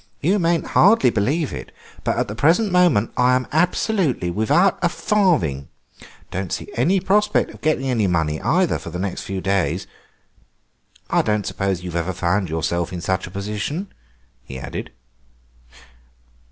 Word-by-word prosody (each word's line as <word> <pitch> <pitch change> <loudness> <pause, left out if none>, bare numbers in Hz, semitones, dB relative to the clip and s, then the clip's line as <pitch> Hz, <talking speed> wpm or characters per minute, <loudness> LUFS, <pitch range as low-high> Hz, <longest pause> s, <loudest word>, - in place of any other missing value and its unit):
You 190 - +2
mayn't 170 -1 +1
hardly 200 - +5
believe 140 +10 0
it, - - -7 0.3
but - - 0
at - - 0
the 105 - -5
present 170 - +2
moment 175 - +3
I 125 0 +4
am 130 0 0
absolutely 165 - +1
without 140 - +2
a 175 - +2
farthing. 165 - +1 0.6
Don't 95 0 -4
see - - -4
any 190 0 +2
prospect 205 +3 +1
of - - -15
getting 155 -3 0
any 115 -6 +1
money, 80 -3 0
either, 175 +4 +1
for - - -8
the - - -6
next 95 +1 -3
few 95 -1 -4
days. 95 -3 0 1.3
I - - +4
don't 105 -2 -1
suppose 95 -2 -2
you've 90 -2 -6
ever 85 +2 -1
found 90 +2 0
yourself 80 +2 -1
in 90 - -5
such 95 +1 -1
a - - -9
position," 105 - -4 0.5
he 65 - -8
added. 65 - -6
110 Hz, 155 wpm, -21 LUFS, -, 1.3 s, hardly